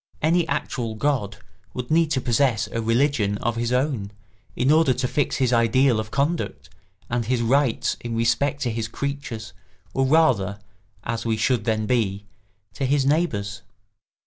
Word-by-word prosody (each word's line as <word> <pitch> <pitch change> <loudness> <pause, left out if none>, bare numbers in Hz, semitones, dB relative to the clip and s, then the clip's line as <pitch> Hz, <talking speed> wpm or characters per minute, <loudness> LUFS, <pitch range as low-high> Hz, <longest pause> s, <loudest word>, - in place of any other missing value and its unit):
Any 170 +3 +2
actual 125 -5 -2
god 110 -5 -1 0.4
would 125 +1 -5
need 165 0 +3
to 140 -4 0
possess 120 -2 +2
a 115 - -4
religion 115 -3 +1
of 120 +2 -2
his 115 +1 -1
own, 125 -6 0 0.5
in 130 +3 +2
order 155 -5 +4
to 125 0 -1
fix 145 +2 0
his 130 -2 +1
ideal 115 +1 +3
of 110 0 -4
conduct 135 - -2 0.4
and 120 -1 -1
his 120 +1 0
rights 130 0 +1
in 120 -1 -5
respect 120 +5 +1
to 120 - 0
his 110 0 -3
creatures 120 -3 -5 0.4
or 135 0 +1
rather, 130 - +3 0.5
as 115 0 -3
we 115 -1 0
should 115 -1 +1
then 110 -1 0
be, 105 -4 0 0.5
to 135 - -2
his 140 0 +2
neighbours. 105 - 0
120 Hz, 160 wpm, -23 LUFS, 110-140 Hz, 0.5 s, order